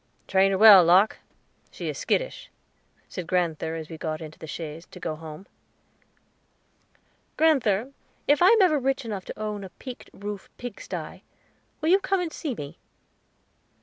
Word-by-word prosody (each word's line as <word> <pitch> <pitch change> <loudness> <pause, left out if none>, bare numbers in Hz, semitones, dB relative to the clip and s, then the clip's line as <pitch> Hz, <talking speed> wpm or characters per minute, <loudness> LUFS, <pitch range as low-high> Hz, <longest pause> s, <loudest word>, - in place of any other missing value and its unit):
"Train 195 0 +4
her 195 - +1
well, 205 -3 +10
Locke; 185 +5 +4 0.5
she - - -7
is - - -3
skittish," - - -2 0.6
said 180 -3 -6
grand'ther 165 -3 0
as 160 -1 -6
we 160 -1 -9
got 155 -1 -3
into 155 -2 -10
the 160 - -9
chaise 160 +1 -7
to - - -12
go 160 -2 -3
home. 155 +3 -10 1.9
"Grand'ther, 265 -6 +2 0.3
if 290 +2 +4
I 360 - +7
am 440 0 +6
ever 310 -5 +3
rich 270 0 -1
enough 205 -4 -5
to - - -8
own 210 -2 -4
a 190 - -8
peaked 255 +6 -10
roof 205 -1 -7
pig 245 0 -7
sty, - - -7 0.6
will 310 - +1
you 380 +3 +6
come 390 -1 0
and 345 -3 -3
see 285 -6 -4
me?" 145 -7 -8
200 Hz, 165 wpm, -26 LUFS, 165-275 Hz, 1.9 s, well